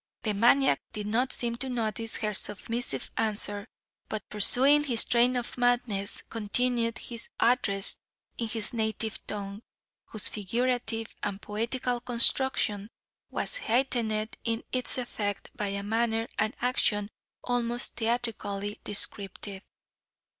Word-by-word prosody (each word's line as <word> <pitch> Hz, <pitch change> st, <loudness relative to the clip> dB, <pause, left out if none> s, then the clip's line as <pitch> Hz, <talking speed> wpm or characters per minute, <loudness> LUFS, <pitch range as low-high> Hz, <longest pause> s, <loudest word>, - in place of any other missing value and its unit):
The 215 Hz, -, 0 dB
maniac 245 Hz, +6 st, +4 dB
did 210 Hz, -2 st, -4 dB
not 245 Hz, +5 st, +1 dB
seem 235 Hz, -1 st, -1 dB
to 265 Hz, +2 st, -3 dB
notice 225 Hz, -2 st, -2 dB
her 215 Hz, -1 st, -1 dB
submissive 210 Hz, -, -3 dB
answer, 205 Hz, -1 st, +1 dB, 0.4 s
but 215 Hz, -, -4 dB
pursuing 265 Hz, +8 st, +6 dB
his 240 Hz, -5 st, +4 dB
train 245 Hz, +1 st, +4 dB
of 245 Hz, 0 st, -3 dB
madness, 240 Hz, -5 st, +1 dB
continued 230 Hz, +1 st, 0 dB
his 235 Hz, 0 st, -6 dB
address 225 Hz, -5 st, +3 dB, 0.4 s
in 230 Hz, -, -2 dB
his 220 Hz, 0 st, -1 dB
native 220 Hz, -1 st, -2 dB
tongue, 200 Hz, 0 st, -5 dB, 0.4 s
whose 215 Hz, -3 st, -1 dB
figurative 230 Hz, +2 st, -1 dB
and 200 Hz, -1 st, -3 dB
poetical 240 Hz, +4 st, -2 dB
construction 235 Hz, -4 st, +2 dB, 0.4 s
was -, -, -1 dB
heightened 230 Hz, -, 0 dB
in 230 Hz, 0 st, -1 dB
its 255 Hz, 0 st, +2 dB
effect, 205 Hz, -5 st, -3 dB
by 205 Hz, -, -2 dB
a 200 Hz, 0 st, -3 dB
manner 225 Hz, +1 st, 0 dB
and 215 Hz, +4 st, +1 dB
action 210 Hz, -4 st, +1 dB, 0.3 s
almost 240 Hz, -1 st, +1 dB
theatrically 220 Hz, -3 st, -2 dB
descriptive. 200 Hz, -1 st, -3 dB
225 Hz, 120 wpm, -29 LUFS, 210-245 Hz, 0.4 s, pursuing